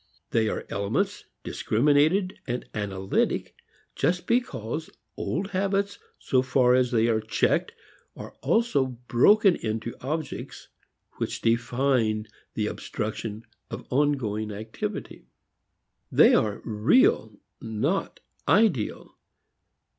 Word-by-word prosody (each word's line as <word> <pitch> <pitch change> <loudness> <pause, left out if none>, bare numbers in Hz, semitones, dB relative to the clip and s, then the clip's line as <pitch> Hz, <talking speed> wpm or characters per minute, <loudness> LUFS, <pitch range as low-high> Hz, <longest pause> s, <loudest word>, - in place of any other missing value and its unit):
They 110 -1 +2
are - - -4
elements, 100 0 -1 0.2
discriminated, 150 - +2 0.3
analytic 95 -2 -1 0.4
just 175 +5 0
because 160 - -1 0.3
old 190 +5 -3
habits 200 +1 0 0.2
so 130 - +1
far 130 -1 +3
as 125 -1 +3
they 115 -1 +2
are 110 -2 +1
checked 110 - 0 0.4
are - - -9
also 225 - +2 0.2
broken 195 - +5
into 110 +1 -3
objects 150 +1 -5 0.5
which - - -3
define 115 -2 +1 0.3
the - - 0
obstruction 110 +1 -4 0.2
of - - -7
ongoing 125 -7 0
activity. 110 +2 -6 0.8
They - - +6
are 105 -2 +1
"real," 110 - +3 0.2
not 120 - -2 0.3
ideal. 195 - +1
125 Hz, 95 wpm, -26 LUFS, 110-160 Hz, 0.8 s, They